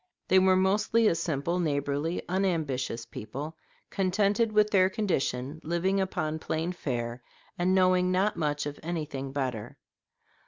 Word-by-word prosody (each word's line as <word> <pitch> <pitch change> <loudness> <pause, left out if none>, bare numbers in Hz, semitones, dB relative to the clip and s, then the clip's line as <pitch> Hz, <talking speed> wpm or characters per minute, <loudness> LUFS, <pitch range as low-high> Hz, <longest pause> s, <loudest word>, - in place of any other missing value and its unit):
They 190 - +6
were 185 0 +5
mostly 210 +4 +2
a - - +4
simple, 165 +1 -1
neighborly, 145 0 -1
unambitious 155 -11 -1
people, 140 +8 -7 0.4
contented 200 +4 +1
with 210 0 +3
their 185 -2 +5
condition, 155 - -2
living 180 +4 +1
upon 160 -4 -2
plain 160 +2 -2
fare, 120 -8 -4 0.3
and 185 +2 +1
knowing 185 -1 +3
not 190 +3 +2
much 150 -2 -1
of 145 0 -5
anything 150 -5 -4
better. 130 -6 -3
170 Hz, 130 wpm, -28 LUFS, 145-190 Hz, 0.4 s, They